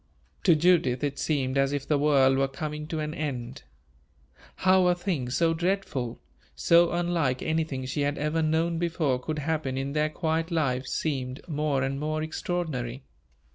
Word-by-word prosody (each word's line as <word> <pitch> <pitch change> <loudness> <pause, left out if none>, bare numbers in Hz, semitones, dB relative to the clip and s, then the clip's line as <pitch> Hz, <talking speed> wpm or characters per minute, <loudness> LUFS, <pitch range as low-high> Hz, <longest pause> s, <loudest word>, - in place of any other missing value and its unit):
To 175 -4 +6
Judith 155 -6 +3
it 140 -1 -2
seemed 135 -3 0
as 135 0 +2
if 140 -1 -3
the 150 -2 +2
world 140 -2 +4
were 135 - +3
coming 150 +2 -5
to 160 0 -3
an 150 0 -3
end. 130 -5 -4 0.9
How 185 -1 +4
a 180 - +4
thing 175 -9 -2
so 165 +6 +2
dreadful, 165 -9 -2 0.4
so 170 - +4
unlike 170 -7 0
anything 155 -5 -1
she 140 +3 -2
had 145 0 0
ever 150 +2 0
known 165 +2 +1
before, 160 -6 0
could 155 +5 -4
happen 150 -3 -2
in 135 +1 -3
their 150 0 +1
quiet 160 +1 -1
lives, 135 -6 -1
seemed 135 -2 -3
more 150 -4 0
and 135 +1 -2
more 155 +1 -2
extraordinary. 155 -7 -3
150 Hz, 165 wpm, -27 LUFS, 135-165 Hz, 0.9 s, To